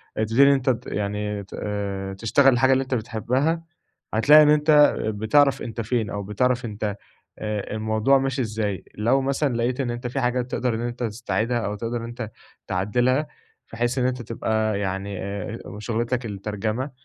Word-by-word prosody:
تبتدي 115 +5 +3
إن - - +7
أنت 130 -3 +3
يعني 105 0 -3
آآ، 100 -2 -3
تشتغل 120 +7 +4
الحاجة 130 +2 +4
اللي 130 - +2
أنت 130 0 -5
بتحبها، 125 +8 -1 0.5
هتلاقي 150 +8 +7
إن 150 - +4
أنت 150 0 +5
بتعرف 110 +7 +3
أنت 115 0 -4
فين 115 -1 -1
أو 100 0 -4
بتعرف 125 +5 0
أنت 105 -2 -3 0.4
آآ، 105 -1 -3
الموضوع 110 +5 +2
ماشي 135 0 -1
إزاي، 105 -3 -2
لو 120 +6 +2
مثلًا 135 -1 0
لقيت 120 +3 -1
إن 120 -2 -1
أنت 120 +1 -4
في 125 +3 -3
حاجات 125 0 -1
تقدر 125 -2 0
إن 115 - -3
أنت 120 +1 -4
تستعيدها 115 +1 -1
أو 105 -2 -3
تقدر 115 +3 -3
إن 115 - -5
أنت 115 -2 -6 0.4
تعدلها، 120 +10 +1 0.5
بحيث 120 +2 -1
إن 125 - +2
أنت 125 -1 -2
تبقى 110 -2 -1
يعني 95 0 -3
آآ، 100 +3 -5 0.2
شغلتك 120 +2 -2
الترجمة، 110 +5 -3
115 Hz, 165 wpm, -24 LUFS, 105-130 Hz, 0.5 s, إن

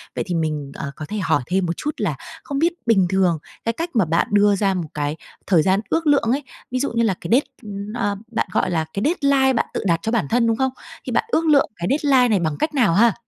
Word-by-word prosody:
Vậy - - -1
thì 180 - -2
mình, 155 -4 -2
ờ, 140 - -5
có 155 - -7
thể 215 - -3
hỏi 165 -6 +1
thêm 185 +1 +1
một 170 - -1
chút 300 - -2
là, 175 -9 -1 0.3
không 280 -1 -3
biết 340 +2 +2
bình 205 -6 +4
thường 185 -4 +2 0.3
cái 230 - +1
cách 335 +7 -4
mà 205 -6 +4
bạn 165 +2 +1
đưa 205 0 +4
ra 195 -1 +1
một 175 -4 -3
cái 145 0 -2 0.3
thời 175 -5 +4
gian 190 +4 +2
ước 325 -1 0
lượng 280 -6 +3
ấy, 280 +2 0 0.3
ví 255 - -1
dụ 280 - -1
như 230 0 +1
là 210 - +2
cái 170 - -6
đết 255 +5 +4 0.5
ơ, 205 -4 -1 0.2
bạn 230 - -1
gọi 185 - +1
là 160 -2 0
cái 200 - -2
deadline 280 -4 +3
bạn 230 - +1
tự - - -2
đặt 170 -3 +2
cho 225 - -1
bản 215 -12 0
thân, 235 0 +2
đúng 225 - +2
không? 265 0 +1 0.3
Thì - - -4
bạn - - +2
ước 330 - +2
lượng 295 -3 +4
cái 175 - -4
deadline 270 -3 +3
này 210 -5 +2
bằng 155 -3 -1
cách 310 0 -1
nào 235 - +3
ha? 225 +3 +5
210 Hz, 265 wpm, -21 LUFS, 175-265 Hz, 0.5 s, ha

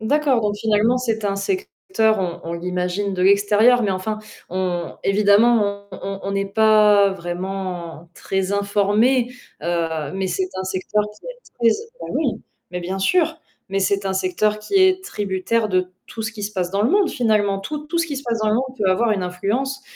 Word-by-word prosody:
D'accord, 275 +2 +2
donc 210 -2 0
finalement 220 +3 +2
c'est 225 -4 -2
un 200 -1 0
secteur, 225 - 0
on 175 -2 -3
on 165 - -4
l'imagine 180 +3 -2
de 180 - -1
l'extérieur, 205 +5 +4
mais 205 - +1
enfin, 195 +3 -2 0.3
on 180 -2 -2
évidemment 205 0 +3
on - - -9
on 195 0 -4
on 195 - -3
n'est 195 0 0
pas 210 -1 +5
vraiment 175 -2 -5
très 190 0 -2
informé, 210 +5 +2 0.3
heu, 165 -2 -2
mais 190 0 -2
c'est 185 +1 -1
un 190 - -3
secteur 190 +3 -1 0.2
qui - - -15
est - - -8 0.2
très 235 -2 +3 0.3
bah - - -6
oui, - - -1 0.3
mais 180 - -4
bien 185 +2 -4
sûr, 330 - +2 0.3
mais 195 0 -1
c'est 195 +1 +1
un 190 - 0
secteur 190 +3 0
qui 215 - -6
est 375 -1 +4
tributaire 210 - -1
de 185 -2 0 0.2
tout 225 - -7
ce 220 - -2
qui 210 -2 -6
se 210 - -4
passe 180 -3 -2
dans 200 +2 0
le 230 - +2
monde 400 -2 +3
finalement. 210 -5 +1
Tout 300 +9 -5
tout 340 - -1
ce 335 - +1
qui 285 -4 -4
se 275 - -5
passe 230 -1 -1
dans 215 -1 +1
le - - +2
monde 260 +2 -2
peut 200 -3 +1
avoir 225 +5 +2
une 195 -3 0
influence, 240 +10 -2
205 Hz, 200 wpm, -21 LUFS, 190-230 Hz, 0.3 s, pas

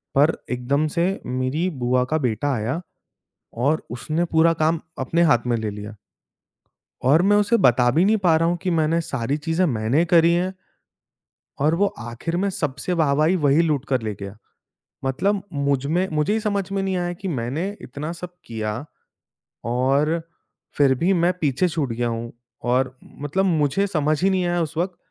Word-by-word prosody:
पर 145 +4 +5 0.2
एकदम 130 +5 0
से 170 - +3 0.2
मेरी 130 +8 -1
बुआ 125 +1 +2
का 155 - +3
बेटा 135 0 -1
आया 125 +8 -2 0.9
और 155 +2 +2
उसने 155 +8 -2
पूरा 165 0 +3
काम 160 +1 +2 0.2
अपने 160 +6 +1
हाथ 120 -3 +3
में 120 -1 +1
ले 110 -1 -3
लिया। 105 +1 -8 1.1
और 145 +6 +5
मैं 205 +3 +4
उसे 210 +3 +3
बता 125 - +4
भी 165 +8 +3
नहीं 220 +2 +4
पा 165 -2 +5
रहा 165 - +2
हूँ 175 - 0
कि 185 - -1
मैंने 160 +2 +2
सारी 140 -2 -2
चीज़ें 165 +4 0
मैंने 120 +2 +1
करी 170 0 +5
हैं। 180 +2 0 1.1
और 150 +4 +3
वो 200 +4 +3
आखिर 120 +9 -4
में 200 +2 +1
सबसे 150 -1 -2
वाह-वाही 155 +1 +2
वही 150 -2 +3
लूटकर 140 -5 0
ले 110 -1 -3
गया। 100 +1 -7 0.7
मतलब 190 +9 0
मुझ 140 -2 0
में 175 +6 +1
मुझे 150 +6 +1
ही 220 - +1
समझ 200 -3 -2
में 195 0 0
नहीं 190 -1 -1
आया 175 0 -2
कि 190 +3 -7
मैंने 140 +3 -2
इतना 145 +5 -6
सब 180 +1 -8
किया 110 +3 -4 0.8
और 140 +7 +1 0.6
फिर 140 -2 +5
भी 175 +9 +2
मैं 175 0 +3
पीछे 145 +4 +2
छूट 155 -7 -2
गया 120 +1 -1
हूँ। 115 0 -4 0.3
और 130 +1 +1 0.3
मतलब 160 +7 0
मुझे 160 +1 +2
समझ 155 -3 0
ही 195 - +4
नहीं 185 -2 +1
आया 175 0 0
उस 160 -1 -3
वक़्त 180 +2 -1
155 Hz, 175 wpm, -22 LUFS, 130-175 Hz, 1.1 s, पर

